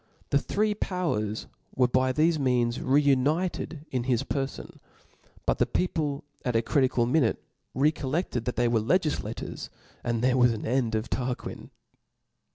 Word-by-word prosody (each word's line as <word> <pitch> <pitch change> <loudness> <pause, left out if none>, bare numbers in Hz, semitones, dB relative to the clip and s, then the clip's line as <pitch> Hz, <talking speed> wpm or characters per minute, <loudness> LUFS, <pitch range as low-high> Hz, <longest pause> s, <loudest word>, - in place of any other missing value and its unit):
The 140 - +4
three 210 +7 0
powers 130 - -2 0.3
were 125 -1 +4
by 130 +1 +2
thefe 155 +3 +2
means 125 -3 +1
reunited 150 +3 +1
in 125 -2 -1
his 125 -1 +1
perfon 135 -1 -3
•» - - -18 0.7
but - - +1
the - - +3
people 155 -6 -1 0.2
at 125 -2 -1
a 115 - +3
critical 130 -3 +2
minute 125 -1 +2 0.4
recollected 145 -2 0
that 125 - -2
they 120 +1 +2
were 115 -1 +2
legiflators^ 155 - -1 0.3
dod 120 0 -1
there 130 0 +3
was 125 -2 +5
an 110 - -5
end 120 -2 +1
of 110 +2 -1
Tarquin. 125 -1 -3
130 Hz, 150 wpm, -27 LUFS, 120-150 Hz, 0.7 s, was